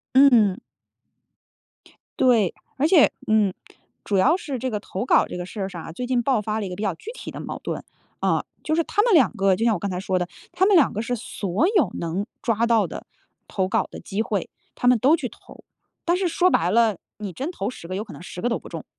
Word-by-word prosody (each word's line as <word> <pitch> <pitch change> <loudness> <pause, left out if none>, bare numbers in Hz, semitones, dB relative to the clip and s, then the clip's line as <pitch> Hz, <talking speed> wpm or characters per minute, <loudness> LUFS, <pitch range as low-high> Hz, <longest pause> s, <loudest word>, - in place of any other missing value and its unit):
嗯 275 +1 +8
嗯。 210 -5 +4 1.6
对， 230 -8 +4 0.2
而 295 +4 +3
且， 330 -4 +6 0.2
嗯， 215 -3 +3 0.5
主 200 - 0
要 305 - +4
是 285 - -5
这 260 - -2
个 210 -2 -2
投 195 +4 -5
稿 - - +5
儿 - - -6
这 - - -6
个 175 - -4
事 200 +2 -7
儿 190 - -2
上 170 -3 -8
啊， - - -8
最 245 +9 -5
近 245 -1 +1
爆 245 -3 +1
发 215 +1 -2
了 205 - -3
一 - - -5
个 180 - -5
比 205 - -5
较 195 -4 0
具 435 - -9
体 - - -8
的 - - -8
矛 - - -6
盾。 - - -4 0.4
啊， - - +1 0.2
就 310 - -1
是 335 +1 +2
他 415 - +2
们 470 -3 +3
两 265 - +5
个 195 -1 +3
就 230 - 0
像 225 - +4
我 180 - -2
刚 200 0 -3
才 180 - -3
说 185 -1 -1
的， 180 -1 -1 0.3
他 375 - +3
们 405 -1 +5
两 290 - +4
个 215 - -2
是 245 +1 -3
所 205 - -1
有 245 - +3
能 175 +5 -2 0.2
抓 230 0 +1
到 230 -2 +3
的 - - -8 0.4
投 190 -2 0
稿 210 0 +1
的 - - -8
机 200 +3 -3
会 205 -5 -2 0.3
他 245 - -1
们 250 -1 +6
都 280 +9 +4
去 - - -3
投。 - - -16 0.4
但 345 +1 +3
是 370 -1 0
说 365 +2 +3
白 175 - +2
了， 225 -4 +3 0.2
你 205 -4 -6
真 285 - -4
投 205 - -3
10 210 - -10
个 185 - -4
有 210 - -2
可 205 - -11
能 - - -11
10 180 - -9
个 - - 0
都 235 - 0
不 - - -12
中。 - - -7
220 Hz, 270 characters per minute, -23 LUFS, 195-265 Hz, 1.6 s, 嗯